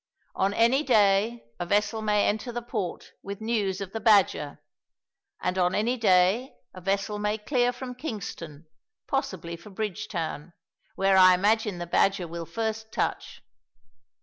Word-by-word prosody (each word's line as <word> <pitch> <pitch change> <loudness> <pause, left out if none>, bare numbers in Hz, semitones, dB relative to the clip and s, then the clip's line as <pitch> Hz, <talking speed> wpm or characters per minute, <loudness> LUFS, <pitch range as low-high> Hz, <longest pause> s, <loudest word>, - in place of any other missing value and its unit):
On 195 +1 +1
any 235 +5 +4
day 220 -3 +3 0.2
a 175 - -2
vessel 210 +3 +1
may 210 -1 +2
enter 220 +4 -1
the 240 0 -5
port 210 -7 -4
with 200 0 -7
news 210 -4 -1
of 195 -1 -5
the 225 - -4
Badger, 200 -9 +3 0.8
and 180 +1 -1
on 180 0 +2
any 230 +4 +1
day 205 +2 +3 0.2
a 185 - -10
vessel 195 +2 -1
may 210 +1 0
clear 245 +2 +1
from 250 0 -7
Kingston, 180 - -7 0.4
possibly 190 - -3
for 170 +5 -13
Bridgetown, 180 -6 -4 0.4
where 195 0 +3
I 185 -1 +8
imagine 210 +1 +1
the 175 - -4
Badger 185 +1 +1
will 165 0 -6
first 220 -1 -3
touch. - - -3
205 Hz, 150 wpm, -27 LUFS, 185-225 Hz, 0.8 s, I